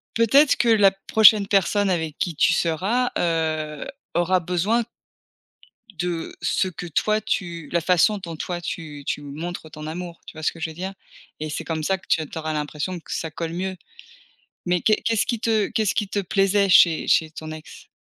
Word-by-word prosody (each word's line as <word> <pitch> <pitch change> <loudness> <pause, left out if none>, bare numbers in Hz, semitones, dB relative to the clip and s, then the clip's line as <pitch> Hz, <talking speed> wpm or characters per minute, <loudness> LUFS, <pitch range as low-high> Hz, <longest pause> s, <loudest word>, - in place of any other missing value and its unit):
Peut-être 270 +6 +5
que 240 - +2
la 205 -3 +6 0.2
prochaine 215 -2 +6
personne 200 +1 +2
avec 160 -4 -2
qui 170 -3 -2
tu - - +4
seras, 195 +10 0
heu, 155 -3 -1 0.3
aura 175 +2 +3
besoin 180 +7 0 1.1
de 175 -1 -3
ce - - +1
que 180 -1 -7
toi 215 +6 0
tu 170 -7 -3
la 170 -1 +1
façon 180 +5 +3
dont 170 -4 -7
toi 175 +2 -4
tu 150 -4 -6
tu 145 - -2
montres 160 +3 -7
ton 155 0 -8
amour. 170 +1 -6
Tu - - -9
vois 155 0 -9
ce - - +2
que 165 - -13
je 160 - -2
veux - - -9
dire? 190 +4 -5 0.5
Et 155 0 -4
c'est 150 - -4
comme 160 -1 -3
ça 190 +4 +1
que 190 - -21
tu - - +3
as - - -4
tu 155 - -9
auras 155 0 -3
l'impression 150 +4 -3
que - - -13
ça 160 -2 -3
colle 165 0 -5
mieux. 190 +2 -3 0.9
Mais 180 -1 +1
qu'est 215 -1 +4
qu'est-ce 225 -2 +1
qui 235 -3 -2
te 220 -3 +1
qu'est-ce 220 -3 0
qui 210 - -1
te 205 - -2
plaisait 195 +1 +2
chez 170 -3 +5
chez 160 -1 +3
ton 155 0 -8
ex? 155 -1 -11
175 Hz, 200 wpm, -23 LUFS, 160-200 Hz, 1.1 s, la